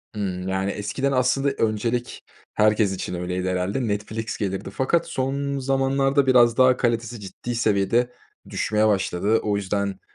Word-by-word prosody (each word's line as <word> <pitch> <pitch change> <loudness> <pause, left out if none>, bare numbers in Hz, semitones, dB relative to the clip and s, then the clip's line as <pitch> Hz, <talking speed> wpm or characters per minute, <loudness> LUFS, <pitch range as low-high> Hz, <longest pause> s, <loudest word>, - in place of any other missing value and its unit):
Hımm, 95 -3 -3
yani, 95 +1 -1
eskiden 110 +8 -2
aslında 135 +2 +2
öncelik 115 0 -2 0.3
herkes 105 -1 +3
için 90 - -5
öyleydi 90 +1 -2
herhâlde. 95 +7 -1
Netflix 110 +2 -3
gelirdi 95 -1 -3
fakat 135 +11 0
son 140 +1 -2
zamanlarda 135 +1 +1
biraz 120 -2 +5
daha 130 -1 +5
kalitesi 120 -1 -1
ciddi 105 +4 -6
seviyede 115 +2 +1 0.4
düşmeye 110 0 +1
başladı. 100 +1 +1
O 105 -1 0
yüzden 100 0 -2
110 Hz, 135 wpm, -23 LUFS, 100-130 Hz, 0.4 s, biraz